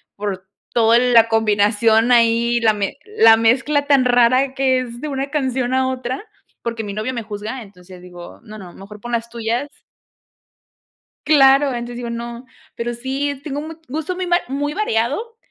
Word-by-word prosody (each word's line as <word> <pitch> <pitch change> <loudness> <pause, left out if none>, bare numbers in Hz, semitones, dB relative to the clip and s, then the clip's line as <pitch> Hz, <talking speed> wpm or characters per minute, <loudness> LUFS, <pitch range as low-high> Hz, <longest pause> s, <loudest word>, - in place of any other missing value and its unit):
por 195 -2 -5 0.3
todo 230 0 +4
la 240 -2 +4
combinación 220 +1 +2
ahí, 235 0 +3
la 225 -2 +3
me 205 +4 -3
la 225 - +5
mezcla 265 +6 +1
tan 280 -3 +4
rara 245 0 +4
de 270 -1 -3
que 265 -1 +1
es 240 -1 -8
de 305 - -5
una 275 -1 -3
canción 260 -4 -1
a 260 0 +1
otra, 255 +2 -4 0.4
porque 230 -1 -4
mi 205 -1 -6
novio 215 +5 -3
me 235 -2 -4
juzga, 215 +4 -6
entonces 185 -3 -14
digo: 175 -1 -12
"No, 215 -2 -11
no, 180 -4 -11
mejor 205 +2 -12
pon 240 +3 -7
las 235 0 -2
tuyas" 235 +4 -3 1.6
Claro, 275 -1 +5
entonces 240 0 -5
digo: 240 -1 -5
"No". 235 +1 -7 0.3
Pero 240 +1 -4
sí 270 +3 -3
tengo 290 -2 -4
un 310 - -7
mu 325 - -8
gusto 315 +6 -4
muy 370 0 -3
mar 350 0 +2
muy 290 +2 -3
variado, 415 - -2
240 Hz, 180 wpm, -19 LUFS, 225-270 Hz, 1.6 s, la